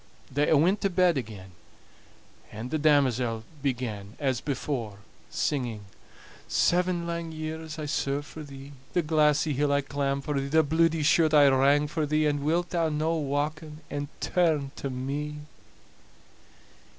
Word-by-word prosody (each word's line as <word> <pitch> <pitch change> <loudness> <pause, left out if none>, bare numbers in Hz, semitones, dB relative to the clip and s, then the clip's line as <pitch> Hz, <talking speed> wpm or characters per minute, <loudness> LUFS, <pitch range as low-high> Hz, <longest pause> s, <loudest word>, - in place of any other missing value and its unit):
They 145 +3 +1
a' 155 - +5
went 185 +8 +3
to 195 - +2
bed 180 -2 +3
again, 105 -7 -6 1.0
and 110 +4 -7
the 155 - 0
damosel 130 -6 +2 0.2
began, 115 -7 -3
as 130 -5 0
before, 130 -7 -3 0.3
singing: 120 -7 -2 0.7
"Seven 180 -1 +1
lang 170 -1 -4
years 155 0 -6
I 155 - -4
served 145 0 -1
for 155 - -10
thee, 140 -1 -10 0.2
The 175 - +2
glassy 150 -1 +2
hill 145 +1 +1
I 140 0 +3
clamb 140 0 -2
for 140 0 -2
thee, 135 - -3
The 160 +3 +4
bluidy 160 +1 +2
shirt 155 0 +4
I 145 -1 +7
wrang 140 +2 +4
for 155 0 -2
thee; 155 +1 +2
And 145 -1 +1
wilt 170 +3 0
thou 165 -2 +1
no 155 +2 0
wauken 150 +1 -3
and 145 0 -3
turn 155 -6 +1
to 140 - -4
me?" 140 +4 -4
145 Hz, 150 wpm, -27 LUFS, 135-160 Hz, 1.0 s, I